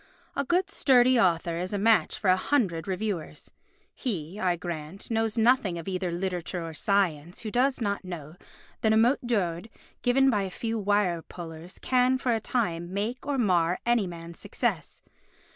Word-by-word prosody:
A 280 - 0
good 360 +7 +1
sturdy 255 -5 +4
author 170 -3 +2
is 180 +3 -3
a - - 0
match 220 +2 +3
for 190 - +3
a - - +5
hundred 185 - 0
reviewers. 190 -3 -4 0.4
He, 185 - -4
I 180 -3 +1
grant, 170 +3 -6
knows 225 0 0
nothing 225 -6 +3
of 165 - -7
either 185 -2 -2
literature 180 -1 -3
or 165 - -7
science 175 -4 0
who 215 - -5
does 255 +3 +2
not 200 -4 -1
know 160 -5 -7 0.5
that 220 -1 +3
a - - +4
mot 240 +5 +4
d'ordre 190 -3 -1 0.3
given 270 +2 +4
by 210 -3 +1
a 195 - -3
few 225 +4 -3
wire 200 -4 +1
pullers 165 +1 -9
can, 255 0 +3
for 255 -2 0
a 225 - +1
time, 175 -8 -2
make 225 +7 -3
or 285 -1 0
mar 180 -6 +2
any 235 -4 +2
man's 170 -1 -9
success. - - -3
200 Hz, 175 wpm, -27 LUFS, 175-235 Hz, 0.5 s, a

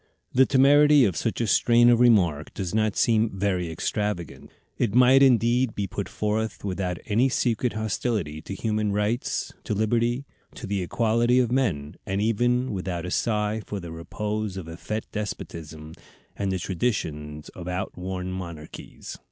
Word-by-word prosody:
The 130 +1 +5
temerity 145 +1 +6
of 95 -5 0
such 115 +8 -2
a - - +1
strain 120 +3 +4
of 120 - +4
remark 90 -11 +3
does 95 -2 -4
not 110 -2 +1
seem 115 -1 +3
very 95 -3 0
extravagant; 90 +1 -3 0.3
it 115 -2 -1
might 125 +2 +6
indeed 125 -1 +3
be 100 - -1
put 95 - -5
forth 110 0 -2
without 90 -2 -2
any 120 +6 +2
secret 120 -1 0
hostility 105 -7 -2
to 100 - -7
human 105 0 -1
rights, 105 +4 -1
to 105 - -2
liberty, 120 +5 0 0.3
to 125 - -7
the 100 -1 -2
equality 115 +6 +2
of 125 -2 +2
men, 90 - -1
and 95 +1 -2
even 120 +4 +1
without 90 -3 -3
a 90 - -5
sigh 105 0 0
for 100 - -4
the 85 -3 -8
repose 105 +4 -4
of 90 -4 -6
effete 105 +6 -5
despotisms, 80 -6 -6 0.4
and 100 -1 -2
the 95 - 0
traditions 80 -7 -3
of 90 -1 -9
outworn 90 0 -4
monarchies. 85 -4 -8
105 Hz, 155 wpm, -25 LUFS, 90-120 Hz, 0.4 s, temerity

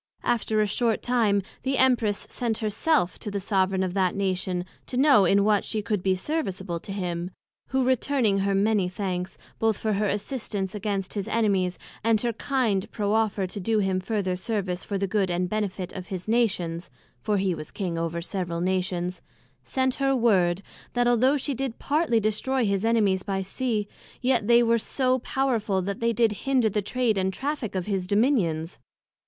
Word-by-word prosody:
After 220 -2 +1
a - - +3
short 225 +2 0
time, 220 -5 +2 0.2
the 270 0 0
Empress 240 -6 +2
sent 230 -3 -2
her 215 -2 -2
self, 265 - +1
to 215 - -5
the 200 0 -2
soveraign 190 -1 +1
of 185 -1 -2
that 185 -2 +1
Nation 185 -2 -1 0.2
to 250 - -4
know 265 -7 +6
in 200 +3 +4
what 210 -1 +3
she 215 -2 -3
could 210 -3 -1
be 190 0 +2
serviceable 190 - -3
to 195 - -9
him; 180 -3 -3 0.4
who 265 0 +1
returning 255 -4 +2
her 195 0 +1
many 200 -2 +2
thanks, 185 -1 -3 0.2
both 220 -2 +2
for 215 -1 -1
her 210 +1 +1
assistance 205 -3 -3
against 200 -2 -3
his 200 -2 -3
Enemies, 195 -5 +1 0.3
and 225 -1 +3
her 235 -1 0
kind 225 -6 0
proffer 210 -1 +1
to 185 +2 -6
do 220 +4 +1
him 190 -2 +1
further 190 -1 -1
service 185 -2 -2
for 200 - -3
the 195 - 0
good 195 -1 0
and 180 +1 0
benefit 195 -3 -3
of 185 -1 -7
his 185 0 -5
Nations 185 -7 0 0.3
(for 210 -1 +1
he 190 -1 +1
was 155 -2 -7
King 180 -5 -3
over 165 0 -2
several 175 -2 -3
Kingdoms) 180 -1 -1 0.4
sent 260 - 0
her 270 0 +3
word, 195 -6 +2 0.3
that 245 0 +2
although 255 +4 +4
she 280 +1 -2
did 260 -2 -3
partly 290 -5 +1
destroy 225 +4 0
his 200 -1 0
Enemies 215 -5 +2
by 195 0 -2
Sea, 215 +1 -2 0.3
yet, 245 -4 +1
they 235 0 +6
were 230 0 +3
so 255 +3 0
powerful, 230 -7 0
that 200 +1 -3
they 230 0 +2
did 230 0 +3 0.2
hinder 255 -5 +3
the 210 +1 0
Trade 225 0 0
and 190 0 +1
Traffick 265 -1 -3
of 185 -2 -1
his 195 -3 -2
Dominions. 195 - +1
205 Hz, 185 wpm, -26 LUFS, 185-235 Hz, 0.4 s, know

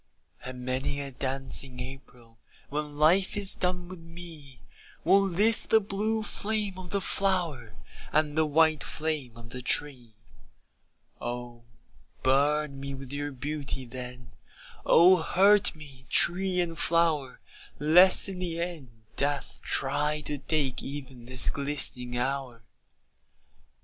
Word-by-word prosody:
And 125 0 -8
many 135 +3 -2
a 140 -1 -4
dancing 130 0 -3
April 125 -3 -11 0.3
When 150 0 -4
life 180 +7 +3
is 200 -2 +4
done 180 -1 -2
with 185 -1 -9
me, 165 -5 -9 0.4
Will 195 +4 +5
lift 200 +4 +1
the 220 - +6
blue 215 +2 -2
flame 210 -2 -1
of 180 -1 -9
the 200 - 0
flower 170 - 0 0.4
And 150 -1 +1
the 160 0 +2
white 155 0 +3
flame 150 -7 -3
of 115 0 -12
the 125 - -5
tree. 125 -4 0 1.1
Oh 120 -1 -6 0.6
burn 140 +2 +1
me 140 0 -5
with 135 0 -8
your 145 0 -3
beauty, 140 -1 -5
then, 125 0 -9 0.6
Oh 180 +1 +6
hurt 195 +4 +4
me, 135 -5 -14
tree 185 +1 +4
and 170 -1 -2
flower, 160 -6 +1 0.4
Lest 175 +8 +6
in 190 -2 -4
the 170 -2 -2
end 170 -7 -4 0.3
death 145 0 -2
try 150 +2 0
to 145 -1 -4
take 140 -3 -1
Even 135 -4 -8
this 130 -1 +1
glistening 135 -4 -1
hour. 130 -2 -3
145 Hz, 130 wpm, -28 LUFS, 130-175 Hz, 1.1 s, the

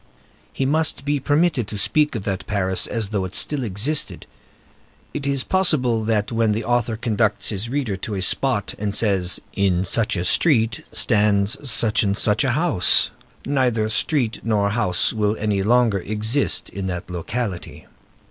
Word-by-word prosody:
He 135 - -2
must 150 -1 0
be 145 0 0
permitted 145 - +1
to 105 - -6
speak 150 +7 +1
of 105 - -4
that 100 -2 -4
Paris 95 -2 0
as 115 -4 -3
though 105 -3 -2
it 95 +1 -6
still 145 -3 +1
existed. 120 +8 -1 0.9
It 140 -1 -4
is 140 -2 0
possible 130 -12 +1
that 105 -1 0
when 115 -2 +1
the 110 +2 -3
author 120 -2 0
conducts 110 -2 0
his 105 +2 -3
readers 125 -8 -2
to 105 - -4
a 95 - -3
spot 120 0 0
and 105 -1 -2
says, 95 -5 +1
"In 95 -2 +1
such 115 +4 +1
a 90 -1 -2
street 115 - +2
there - - -17
stands 105 +5 +1
such 110 -1 +2
and 100 -1 0
such 105 +6 +2
a 130 -3 +1
house," 150 - +4 0.3
neither 125 -6 +1
street 120 0 0
nor 105 -3 0
house 105 -6 +1
will 105 -1 0
any 105 -2 -1
longer 115 -1 +2
exist 110 +8 0
in 95 -1 -5
that 90 -1 -5
locality. 95 +2 -5
110 Hz, 165 wpm, -21 LUFS, 100-130 Hz, 0.9 s, house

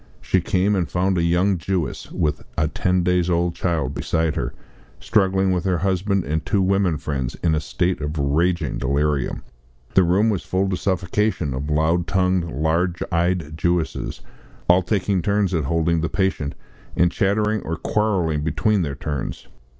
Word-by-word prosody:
She - - +1
came, 95 +3 +1
and 90 -3 -1
found 95 +1 +1
a - - +1
young 90 +2 +2
Jewess, 90 0 -3
with 75 - -1 0.2
a 75 - +2
ten 90 +2 0
days 90 0 +2
old 85 0 +1
child 80 -7 -1
beside 80 +1 -1
her, 65 - -2 0.5
struggling 95 -2 +2
with 90 -2 0
her 90 -2 +2
husband 95 +2 0
and 80 +2 -2
two 100 - +1
women 95 -4 +2
friends 65 -5 -3
in 80 -2 +3
a 80 - +2
state 90 +3 -1
of 75 +2 -3
raging 80 +5 +1
delirium. 70 0 0 0.5
The 95 - +6
room, 95 +6 +3
was 100 - -1
full 95 +1 0
to 95 - 0
suffocation 90 -3 0
of 70 +3 -4
loud 80 +3 +1
tongued, 90 -1 +1
large 85 +5 0
eyed 85 -2 0
Jewesses, 85 0 -1 0.5
all 90 +1 +6
taking 95 0 0
turns 100 0 +1
at 80 -5 0
holding 85 +2 +1
the 80 - -1
patient, 95 -7 -1 0.4
and 85 0 +4
chattering 105 +2 +1
or 80 - -3
quarrelling 95 -8 0
between 100 +6 +1
their 70 -5 -2
turns. 70 -1 -5
85 Hz, 165 wpm, -22 LUFS, 80-95 Hz, 0.5 s, The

